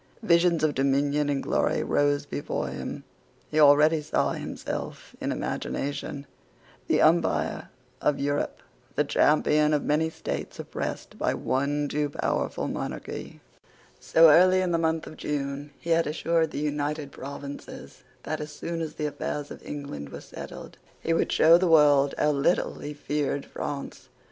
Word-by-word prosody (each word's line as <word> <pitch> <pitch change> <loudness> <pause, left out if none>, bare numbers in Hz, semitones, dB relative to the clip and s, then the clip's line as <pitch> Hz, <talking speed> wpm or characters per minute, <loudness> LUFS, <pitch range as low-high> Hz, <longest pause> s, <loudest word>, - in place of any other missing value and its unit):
Visions 170 -3 +3
of 155 -2 +3
dominion 140 +2 +1
and 140 -1 -1
glory - - +1
rose 145 0 +1
before 145 - -3
him. - - -6 0.5
He 155 - +1
already 150 +2 +6
saw 150 - 0
himself, - - -6
in - - -1
imagination, 140 0 -3 0.6
the - - +3
umpire 155 - +2 0.3
of 150 - +2
Europe, 145 +1 -2 0.3
the 150 - +3
champion 150 +1 +3
of 145 - -1
many 155 +2 +1
states - - -5
oppressed - - -5
by - - +1
one 145 +2 0
too 145 0 -1
powerful - - -2
monarchy. - - -6 0.6
So 165 -1 +6
early 185 +3 +6
as 180 - 0
the 165 - +2
month 160 0 0
of 155 - -10
June 145 0 -3
he 170 - -5
had 165 -1 +3
assured 165 +1 +1
the - - -7
United 145 0 -2
Provinces 140 +1 -9 0.2
that, 155 -1 -3
as 150 0 -6
soon 165 +2 -4
as 160 -2 -4
the 150 - -3
affairs 145 0 -4
of - - -10
England 140 - -6
were - - -8
settled, - - -10 0.2
he 165 - 0
would 165 - +1
show 165 +2 +6
the 185 - +2
world 145 -3 +5
how 150 - +3
little 145 +5 +1
he 150 0 -6
feared 145 -1 -2
France. 140 -1 -6
150 Hz, 155 wpm, -27 LUFS, 145-160 Hz, 0.6 s, already